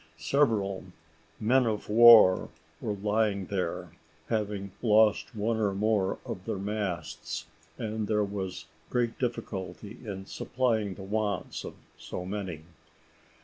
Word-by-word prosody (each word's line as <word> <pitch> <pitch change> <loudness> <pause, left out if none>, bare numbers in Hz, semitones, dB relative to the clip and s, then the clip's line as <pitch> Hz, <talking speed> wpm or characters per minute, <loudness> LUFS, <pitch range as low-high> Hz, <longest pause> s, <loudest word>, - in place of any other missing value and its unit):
Several 105 - +1 0.5
men 125 +3 +3
of 105 -2 -2
war 110 -4 +8 0.3
were 105 - -2
lying 105 -1 0
there, 90 -4 -3 0.4
having 105 -3 -2
lost 110 +1 +3
one 110 +2 0
or 105 -3 0
more 105 -2 +1
of - - -6
their - - -2
masts, 100 -3 -4 0.3
and 110 -1 -3
there 105 0 +2
was 95 -5 -5 0.2
great 120 -2 0
difficulty 110 -3 -4
in 95 -4 -6
supplying 110 -7 -1
the 95 - -9
wants 105 -1 -2
of - - -8 0.2
so 90 - -6
many. 95 -5 -5
105 Hz, 120 wpm, -29 LUFS, 95-110 Hz, 0.5 s, war